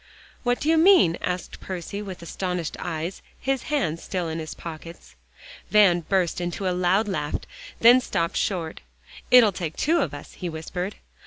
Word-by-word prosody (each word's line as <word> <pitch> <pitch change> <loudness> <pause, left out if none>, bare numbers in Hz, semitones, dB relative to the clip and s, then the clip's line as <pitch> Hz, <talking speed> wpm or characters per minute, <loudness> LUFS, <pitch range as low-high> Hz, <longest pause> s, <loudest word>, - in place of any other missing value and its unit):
"What 245 -1 +1
do 295 - -3
you 320 0 +4
mean?" 335 - +6
asked 180 0 -4
Percy, 190 +2 -5
with 190 -4 -8
astonished 180 -1 -3
eyes, 165 +2 -4 0.2
his 270 -1 -1
hands 205 - 0
still 180 -3 -3
in 160 +1 -3
his 155 -1 -6
pockets. 165 +1 -9 0.6
Van 200 -5 +5
burst 180 0 0
into 175 +2 -3
a 180 - +1
loud 185 +4 +2
laugh, 150 -7 -2 0.5
then 245 +2 +8
stopped 170 -8 -1
short. 170 -5 -2 0.5
"It'll 240 -4 +7
take 170 -4 -5
two 330 +4 +2
of 160 - -1
us," 145 - -10
he 180 - -5
whispered. 180 +4 -5
180 Hz, 165 wpm, -25 LUFS, 165-210 Hz, 0.6 s, then